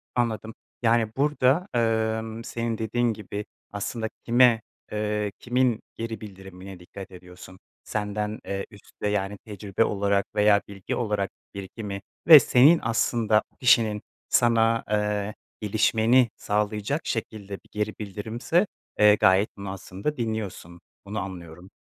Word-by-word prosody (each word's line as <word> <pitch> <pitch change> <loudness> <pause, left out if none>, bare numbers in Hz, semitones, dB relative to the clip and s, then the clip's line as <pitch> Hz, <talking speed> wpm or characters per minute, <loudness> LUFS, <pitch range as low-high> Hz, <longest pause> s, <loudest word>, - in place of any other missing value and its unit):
Anladım, 110 -2 -1 0.3
yani, 115 -1 +2
burada, 145 +4 +2
emm, 110 -1 0
senin 115 -1 -3
dediğin 115 +2 0
gibi, 105 0 -6 0.3
aslında 110 +2 -3 0.2
kime, 120 -1 +5 0.3
eee, 105 -1 -1
kimin 125 -2 +1
geri 115 -2 -5
bildirimine 95 -2 -10
dikkat 95 +2 -10
ediyorsun? 90 0 -13 0.2
Senden, 105 0 -3
eee, 100 0 -3
üstte, 105 0 -7
yani 105 -1 -1
tecrübe 100 0 -2
olarak 100 -1 +1
veya 105 -1 +5
bilgi 100 -2 -5
olarak 105 -4 -1 0.2
birikimi 100 0 -6 0.3
ve 160 -3 +12
senin 140 +6 +5
aslında 115 -1 +2 0.2
kişinin 115 -4 +4 0.3
sana, 115 -1 +3
eee, 105 0 0 0.3
gelişmeni 110 +3 +3
sağlayacak 105 +7 -1
şekilde 110 -3 -4
bir 100 - -9
geri 105 0 -2
bildirimse, 110 - -1 0.3
eee, 105 0 +7
gayet 95 +2 +3
bunu 100 -1 -6
aslında 95 +9 -5
dinliyorsun, 110 -7 -4 0.2
bunu 100 +2 -4
anlıyorum. 90 -1 -8
105 Hz, 120 wpm, -25 LUFS, 100-115 Hz, 0.3 s, ve